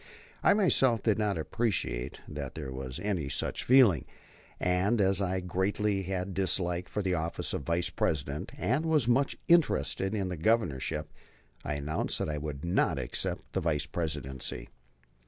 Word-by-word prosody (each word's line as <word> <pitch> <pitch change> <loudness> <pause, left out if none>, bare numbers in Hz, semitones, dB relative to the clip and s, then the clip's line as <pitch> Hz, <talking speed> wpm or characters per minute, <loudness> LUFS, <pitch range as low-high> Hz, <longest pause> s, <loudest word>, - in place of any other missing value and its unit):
] - - -24
I - - +6
myself 130 - +3
did 110 -2 +2
not 105 -4 +1
appreciate 80 - -2
that - - -6
there 65 - -5
was 65 -1 -5
any 90 -9 -2
such - - -1
feeling, 120 - +5 0.5
and 95 +6 +2
as 95 0 +3
I 95 -1 0
greatly 95 +3 0 0.3
disliked 90 -2 -1
the 95 -3 0
office 85 0 -2
of - - -2
Vice 85 +1 -1
President 70 -1 -2
and 150 +8 0
was 150 -7 +3
much 135 +3 +2
interested 150 - +3
in 95 -3 -1
the 90 - -4
Governorship, 75 - 0 0.5
I 75 - -2
announced 75 +3 -2
that - - -2
I 75 -1 -2
would 75 0 -5
not 85 -4 +2
accept 65 -3 -3
the - - 0
Vice 75 -3 0
Presidency. 70 -6 -4
90 Hz, 155 wpm, -30 LUFS, 75-105 Hz, 0.5 s, I